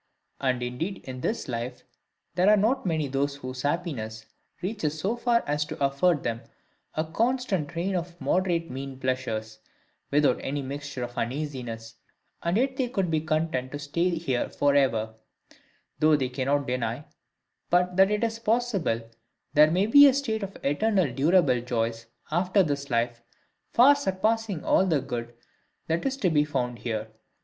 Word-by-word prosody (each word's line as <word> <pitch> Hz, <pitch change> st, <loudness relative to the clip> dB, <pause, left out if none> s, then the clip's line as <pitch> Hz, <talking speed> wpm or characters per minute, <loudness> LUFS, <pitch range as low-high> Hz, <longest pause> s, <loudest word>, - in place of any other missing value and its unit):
And 130 Hz, -2 st, 0 dB
indeed 160 Hz, +11 st, -4 dB
in 130 Hz, -1 st, -7 dB
this 225 Hz, -, -2 dB
life 125 Hz, 0 st, -4 dB, 0.5 s
there 180 Hz, +3 st, +3 dB
are 210 Hz, -, +6 dB
not 225 Hz, +3 st, +1 dB
many 160 Hz, -3 st, 0 dB
whose 135 Hz, -2 st, -3 dB
happiness 135 Hz, -9 st, -3 dB, 0.4 s
reaches 170 Hz, -7 st, -2 dB
so 200 Hz, +8 st, 0 dB
far 235 Hz, -1 st, +2 dB
as 150 Hz, +1 st, 0 dB
to -, -, -7 dB
afford 140 Hz, +3 st, +2 dB
them 115 Hz, -1 st, -2 dB, 0.5 s
a 155 Hz, -, +1 dB
constant 220 Hz, -, 0 dB
train 175 Hz, +3 st, -2 dB
of 175 Hz, 0 st, -4 dB
moderate 175 Hz, -4 st, 0 dB
mean 135 Hz, 0 st, -6 dB
pleasures, 115 Hz, -4 st, -2 dB, 0.5 s
without 145 Hz, -2 st, +3 dB
any 140 Hz, +1 st, -3 dB
mixture 140 Hz, -1 st, -5 dB
of 120 Hz, 0 st, -5 dB
uneasiness; 120 Hz, -3 st, -4 dB, 0.4 s
and 170 Hz, +4 st, +1 dB
yet 265 Hz, +2 st, +1 dB
they 255 Hz, -2 st, 0 dB
could 195 Hz, -7 st, -1 dB
be 155 Hz, -1 st, +1 dB
content 155 Hz, -5 st, -1 dB
to -, -, -2 dB
stay 145 Hz, +5 st, 0 dB
here 160 Hz, -8 st, -1 dB
for 145 Hz, 0 st, +2 dB
ever: 115 Hz, -6 st, +2 dB, 0.9 s
though 155 Hz, 0 st, +5 dB
they 130 Hz, -3 st, 0 dB
cannot 140 Hz, +2 st, 0 dB
deny, 125 Hz, +2 st, -2 dB, 0.6 s
but 180 Hz, +1 st, +2 dB
that 190 Hz, +1 st, +6 dB
it 210 Hz, +1 st, 0 dB
is 225 Hz, 0 st, -1 dB
possible 210 Hz, -, 0 dB, 0.5 s
there 150 Hz, +1 st, +7 dB
may 180 Hz, +5 st, +2 dB
be 285 Hz, +6 st, +9 dB
a 265 Hz, -, +4 dB
state 225 Hz, -6 st, -1 dB
of 195 Hz, -1 st, -6 dB
eternal 180 Hz, -, +1 dB
durable 145 Hz, -3 st, +3 dB
joys 115 Hz, -1 st, -2 dB, 0.2 s
after 185 Hz, +4 st, +3 dB
this 140 Hz, -3 st, -3 dB
life, 120 Hz, -1 st, 0 dB, 0.5 s
far 260 Hz, +4 st, +7 dB
surpassing 220 Hz, -, -1 dB
all -, -, +4 dB
the 160 Hz, -5 st, +2 dB
good 120 Hz, -3 st, -5 dB, 0.5 s
that 165 Hz, +8 st, 0 dB
is 270 Hz, 0 st, -2 dB
to 185 Hz, -10 st, +1 dB
be 150 Hz, -1 st, +4 dB
found 125 Hz, -5 st, -2 dB
here. 110 Hz, -2 st, -3 dB
150 Hz, 160 wpm, -27 LUFS, 130-190 Hz, 0.9 s, be